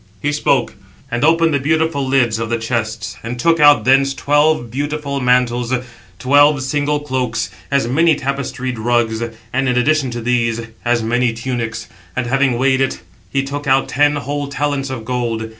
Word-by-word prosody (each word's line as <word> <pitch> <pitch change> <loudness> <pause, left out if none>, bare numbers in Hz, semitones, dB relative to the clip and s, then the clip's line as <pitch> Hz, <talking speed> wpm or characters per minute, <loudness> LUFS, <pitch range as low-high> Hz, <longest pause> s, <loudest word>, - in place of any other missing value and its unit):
He 145 - -1
spoke; 140 -3 +1 0.4
and 120 +2 -1
opened 165 +1 +3
the 140 - +2
beautiful 160 0 0
lids 120 -4 +2
of 115 -1 -3
the 115 - 0
chests, 110 -4 -3
and 120 +2 -6
took 165 +4 +2
out 145 -1 +6
thence 135 +1 +3
twelve 145 -4 +1
beautiful 145 +1 -3
mantles, 125 -1 +1 0.5
twelve 145 +3 +4
single 145 +2 0
cloaks, 130 -8 -2 0.2
as 140 -4 +1
many 160 +5 +3
tapestried 130 -3 -4
rugs, 115 -1 0
and, 115 +3 -3
in 125 - +1
addition 140 +2 +2
to 120 0 -5
these, 115 -1 0 0.2
as 120 -1 +1
many 120 +1 +1
tunics; 115 -2 -4 0.3
and 130 - -1
having 135 0 +1
weighed 130 +1 +2
it, 135 - -1 0.3
he 135 -1 0
took 145 +1 -5
out 135 0 +2
ten 145 +2 +2
whole 145 0 -3
talents 140 -1 -2
of 125 -4 -6
gold. 115 -2 -2
130 Hz, 170 wpm, -17 LUFS, 120-145 Hz, 0.5 s, out